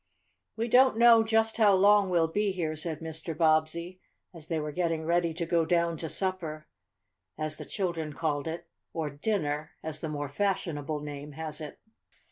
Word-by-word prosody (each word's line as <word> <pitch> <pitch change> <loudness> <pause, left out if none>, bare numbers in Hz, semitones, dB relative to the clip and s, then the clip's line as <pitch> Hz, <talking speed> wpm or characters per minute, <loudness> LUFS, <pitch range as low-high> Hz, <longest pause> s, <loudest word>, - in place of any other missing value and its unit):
"We 230 +1 -1
don't 255 0 +5
know 235 -1 +7
just 225 0 +1
how 210 -3 +5
long 200 0 +5
we'll 170 -2 +3
be 205 +5 0
here," 160 -4 -2
said 155 0 -3
Mr. 160 0 -5
Bobbsey, 165 +3 +1 0.3
as 160 -3 -12
they 165 -2 -1
were 150 0 -3
getting 165 -1 -1
ready 170 0 +2
to 170 0 -2
go 165 0 +2
down 170 0 +1
to 160 +1 -5
supper, 165 -5 -3 0.7
as 155 0 -3
the - - -8
children 170 -6 -3
called 145 -1 -2
it, 170 +2 -5 0.3
or 160 -3 -2
"dinner," 150 -2 -2
as 155 -1 -5
the 160 - -4
more 145 -1 -3
fashionable 155 -3 -2
name 145 0 -7
has 155 +1 -6
it. 150 - -7
165 Hz, 175 wpm, -29 LUFS, 155-185 Hz, 0.7 s, know